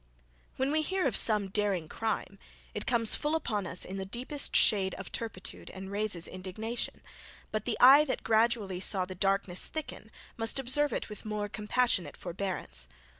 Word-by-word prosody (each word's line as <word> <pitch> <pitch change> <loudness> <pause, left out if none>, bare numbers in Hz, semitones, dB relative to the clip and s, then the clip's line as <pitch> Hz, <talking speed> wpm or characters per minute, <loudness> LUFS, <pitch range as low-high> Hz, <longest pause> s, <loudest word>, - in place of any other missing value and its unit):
When 265 +2 0
we 310 +1 +2
hear 375 +3 -1
of 265 - +1
some 210 -3 +5
daring 195 -5 0
crime 205 0 -3 0.3
it 210 - -5
comes 230 -3 +4
full 300 +1 +1
upon 210 - -2
us 170 - -1
in 190 - -6
the 195 - -3
deepest 250 +8 -4
shade 195 -3 +4
of - - -8
turpitude, 220 -5 -6
and 190 +1 -8
raises 200 -4 -1
indignation; 195 +6 -5 0.5
but 215 -1 -2
the 240 - -1
eye 275 +4 +9
that 260 - -2
gradually 220 -4 +1
saw 185 0 +1
the 185 - -7
darkness 195 -1 0
thicken, 310 -8 -6 0.3
must 225 +2 +1
observe 270 +3 +3
it - - -3
with 210 -2 -9
more 210 -1 -3
compassionate 210 -5 0
forbearance. 175 - -3
210 Hz, 170 wpm, -30 LUFS, 190-240 Hz, 0.5 s, eye